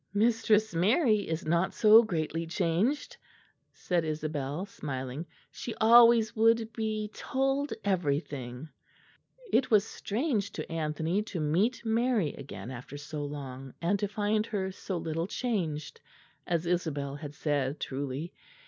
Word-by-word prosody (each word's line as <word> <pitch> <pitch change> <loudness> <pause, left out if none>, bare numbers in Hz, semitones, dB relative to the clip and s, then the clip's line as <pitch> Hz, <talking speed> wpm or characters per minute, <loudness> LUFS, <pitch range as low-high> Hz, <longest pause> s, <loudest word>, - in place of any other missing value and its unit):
"Mistress 220 -1 +3
Mary 210 - +3
is 160 +2 -2
not 170 +4 +1
so 220 +1 +8
greatly 165 -5 -2
changed," 205 - 0 0.5
said 175 -2 -1
Isabel, 155 +1 -3
smiling. 140 -3 -5 0.2
"She 235 - -6
always 230 0 +6
would 225 0 +3
be 215 -1 -2
told 270 +2 -1
everything." 145 -7 -1 0.9
It 260 - +3
was 215 -2 +5
strange 220 -2 -2
to - - -6
Anthony 160 +4 -1
to 210 -5 -5
meet 200 +11 +1
Mary 225 - +1
again 130 -2 -8
after 130 +3 -8
so 150 0 -5
long, 135 -2 -7
and 185 +4 +1
to 205 - 0
find 210 +1 0
her 190 -3 -2
so 190 0 -4
little 165 +1 -2
changed, 175 - -3 0.5
as 170 -1 0
Isabel 150 -5 -1
had 145 -1 -8
said 145 -2 -1
truly. 140 +4 -4
175 Hz, 130 wpm, -30 LUFS, 150-220 Hz, 0.9 s, so